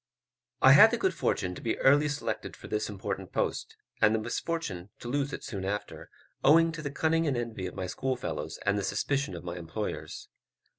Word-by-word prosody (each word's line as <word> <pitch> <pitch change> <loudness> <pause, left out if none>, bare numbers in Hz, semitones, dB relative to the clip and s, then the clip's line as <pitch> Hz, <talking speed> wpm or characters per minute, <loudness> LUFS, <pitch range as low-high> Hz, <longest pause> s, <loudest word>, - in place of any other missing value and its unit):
I 130 - +9
had 150 +11 +9
the 235 - -1
good 190 -4 +1
fortune 90 - -1
to - - -9
be 115 - -1
early 145 +2 +4
selected 145 0 -4
for - - -11
this 105 0 -2
important 100 -2 -5
post, - - -2 0.2
and 110 +1 +5
the - - +1
misfortune 110 - -3
to - - -9
lose 140 +2 -1
it - - -6
soon 100 -4 -5
after, 105 +2 -4 0.3
owing 165 +2 +6
to 165 -1 -6
the 145 - -3
cunning 160 +3 +1
and 135 -4 +1
envy 115 -6 -3
of 90 - -8
my 95 - -3
schoolfellows 130 +7 -3
and 100 +1 +2
the - - -3
suspicion 135 +3 -1
of 85 - -8
my 85 0 -5
employers. 85 +5 -5
120 Hz, 200 wpm, -29 LUFS, 100-145 Hz, 0.3 s, I